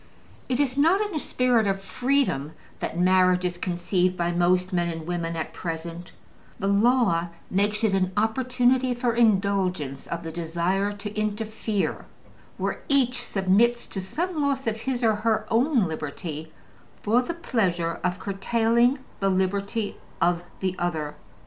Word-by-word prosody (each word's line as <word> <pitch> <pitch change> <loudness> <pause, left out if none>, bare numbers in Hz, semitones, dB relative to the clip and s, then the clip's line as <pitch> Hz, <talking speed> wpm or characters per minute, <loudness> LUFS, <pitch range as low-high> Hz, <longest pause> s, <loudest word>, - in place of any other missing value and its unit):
It 255 0 0
is 275 -1 +1
not 330 +7 +5
in 415 -2 -2
a 310 - -1
spirit 245 -6 +2
of 195 0 0
freedom 195 - 0 0.3
that - - -4
marriage 185 0 +4
is 175 -1 -2
conceived 180 +1 0
by 175 0 0
most 180 +2 +2
men 175 -1 +1
and 165 -1 -5
women 170 -1 -2
at 160 - -4
present: 170 +1 -5 0.5
the - - -4
law 200 -4 +3 0.2
makes 205 +3 +1
it 215 -3 +3
an 185 -1 +1
opportunity 250 +3 +2
for 240 -1 0
indulgence 195 - +1
of 170 0 -4
the 165 - -5
desire 175 +4 -1
to 205 0 -6
interfere, 215 -1 -2 0.5
where - - -2
each 255 -3 +2
submits 215 +5 +2
to 195 - -4
some 325 - -2
loss 275 -1 0
of 225 -1 0
his 255 -1 -2
or 220 -2 +3
her 220 0 +1
own 240 -1 +3
liberty, 155 0 -5 0.5
for 230 +4 +3
the 335 +7 -4
pleasure 180 - 0
of 180 0 0
curtailing 230 +6 +2 0.2
the 195 - +2
liberty 200 +3 -1 0.2
of 175 0 +2 0.2
the 185 -1 -1
other. 155 -4 -2
200 Hz, 150 wpm, -25 LUFS, 175-240 Hz, 0.5 s, not